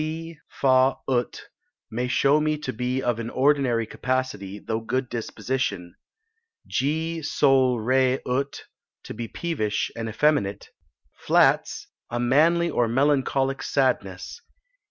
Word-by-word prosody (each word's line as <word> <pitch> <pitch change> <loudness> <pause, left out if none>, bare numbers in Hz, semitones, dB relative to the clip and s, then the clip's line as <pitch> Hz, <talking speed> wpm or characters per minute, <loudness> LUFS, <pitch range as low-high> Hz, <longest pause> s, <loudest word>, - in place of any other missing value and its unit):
C 160 +1 -5 0.2
Fa 130 0 +4
ut 125 -2 -1 0.5
may 120 +3 -2
show 140 +4 +3
me 155 0 0
to 145 -3 -5
be 125 +3 -2
of 120 -2 0
an 115 0 -4
ordinary 130 -4 +2
capacity, 110 -5 -3
though 110 +1 -3
good 130 +2 -2
disposition. 115 -6 -3 0.7
G 160 +4 -1
Sol 135 -4 +3
re 130 +3 +2
ut, 135 +3 -2 0.4
to - - -7
be 115 +1 -5
peevish 125 -9 -2
and 115 -1 -4
effeminate. 110 -6 0 0.5
Flats, - - +2 0.2
a 120 - -3
manly 160 +8 +3
or 120 - +1
melancholic 135 +1 +1
sadness. 125 - -1
130 Hz, 120 wpm, -24 LUFS, 115-145 Hz, 0.7 s, Fa